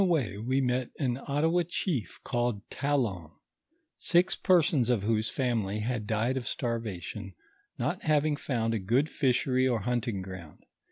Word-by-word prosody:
On 195 Hz, -, +4 dB
tlio -, -, 0 dB
way 130 Hz, -, +1 dB
wo 130 Hz, +5 st, +1 dB
mot 125 Hz, 0 st, 0 dB
an 125 Hz, -3 st, -1 dB
Ottawa 160 Hz, +5 st, +2 dB
chief 155 Hz, -, -2 dB
called 120 Hz, -5 st, -1 dB
Talon, 120 Hz, -, -1 dB, 0.7 s
six 175 Hz, +1 st, +3 dB
persons 165 Hz, -, +3 dB
of 115 Hz, -5 st, +2 dB
whoso 110 Hz, 0 st, +1 dB
family 110 Hz, -6 st, -1 dB
had 115 Hz, -2 st, -2 dB
died 115 Hz, +4 st, +1 dB
of 125 Hz, -, -3 dB
Htarva 115 Hz, -6 st, -2 dB
tion, 100 Hz, -1 st, -7 dB, 0.4 s
not -, -, -1 dB
having 150 Hz, 0 st, +2 dB
found 115 Hz, -5 st, -1 dB
a 110 Hz, -, 0 dB
good 120 Hz, +11 st, +1 dB
fishery 130 Hz, -1 st, +2 dB
or 120 Hz, -4 st, +1 dB
hunting 120 Hz, -4 st, -1 dB
ground. 90 Hz, -5 st, -10 dB
120 Hz, 160 wpm, -29 LUFS, 110-140 Hz, 0.7 s, On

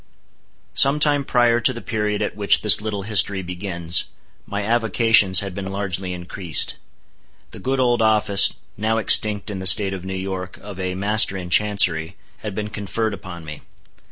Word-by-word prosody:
Some 140 Hz, +2 st, +4 dB
time 145 Hz, -2 st, +2 dB
prior 120 Hz, -2 st, +2 dB
to 120 Hz, -, +1 dB
the 120 Hz, -, -7 dB
period 105 Hz, -3 st, -3 dB
at -, -, -4 dB
which 105 Hz, -1 st, +1 dB
this 105 Hz, -1 st, +4 dB
little 105 Hz, -2 st, -5 dB
history 100 Hz, -2 st, +2 dB
begins, 90 Hz, -1 st, -2 dB, 0.4 s
my 100 Hz, 0 st, -4 dB
avocations 110 Hz, -4 st, +3 dB
had 100 Hz, -2 st, -6 dB
been 95 Hz, 0 st, -6 dB
largely 95 Hz, -2 st, -4 dB
increased. 90 Hz, -2 st, -1 dB, 0.7 s
The -, -, -9 dB
good 135 Hz, +1 st, -2 dB
old 120 Hz, -2 st, +1 dB
office, 105 Hz, -2 st, +3 dB, 0.3 s
now 110 Hz, +2 st, -1 dB
extinct 105 Hz, -1 st, +2 dB
in 95 Hz, -, -6 dB
the 95 Hz, -, -1 dB
State 95 Hz, +2 st, +4 dB
of 95 Hz, -2 st, -7 dB
New 95 Hz, 0 st, -6 dB
York, 95 Hz, -1 st, -6 dB
of 100 Hz, -2 st, -11 dB
a 90 Hz, -1 st, -4 dB
Master 100 Hz, 0 st, +2 dB
in 90 Hz, -1 st, -8 dB
Chancery, 95 Hz, -4 st, +2 dB, 0.2 s
had 105 Hz, -3 st, -7 dB
been 105 Hz, 0 st, -5 dB
conferred 110 Hz, +1 st, -3 dB
upon 85 Hz, -3 st, -10 dB
me. 75 Hz, -1 st, -9 dB
100 Hz, 170 wpm, -20 LUFS, 95-110 Hz, 0.7 s, Some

